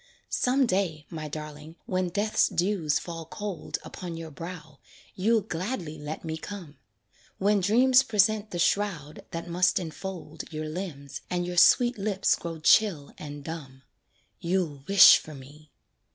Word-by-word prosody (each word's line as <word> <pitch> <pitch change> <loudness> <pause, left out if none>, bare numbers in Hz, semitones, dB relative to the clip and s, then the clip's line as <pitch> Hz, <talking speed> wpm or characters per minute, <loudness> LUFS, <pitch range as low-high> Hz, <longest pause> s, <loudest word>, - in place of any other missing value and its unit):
Some 260 +2 +2
day, 180 -8 -1
my 155 -2 -5
darling, 150 +1 -8
when 185 -1 -1
Death's 205 +4 +2
dews 175 -5 0
fall 165 -1 -6
cold 200 +2 -5
Upon 175 -2 -7
your 165 -1 -7
brow, 160 -2 -9 0.3
you'll 220 +4 +2
gladly 180 -4 -4
let 150 +3 -6
me 160 0 -3
come 175 -5 -9 0.6
When 205 +1 +2
dreams 250 +7 +5
present 215 -2 +2
the 175 - -5
shroud 170 -5 -1
that 165 +1 -6
must 180 +1 +2
enfold 180 +2 -7
Your 155 0 -4
limbs, 150 -5 -6
and 175 -1 -1
your 175 0 -5
sweet 240 +5 +5
lips 195 -1 +1
grow 165 -1 -6
chill 165 -3 +3
and 145 -1 -8
dumb, 135 -5 -8 0.6
You'll 170 -6 -1
wish 200 -1 +9
for 155 - -11
me. 145 +3 -14
170 Hz, 145 wpm, -27 LUFS, 155-200 Hz, 0.6 s, wish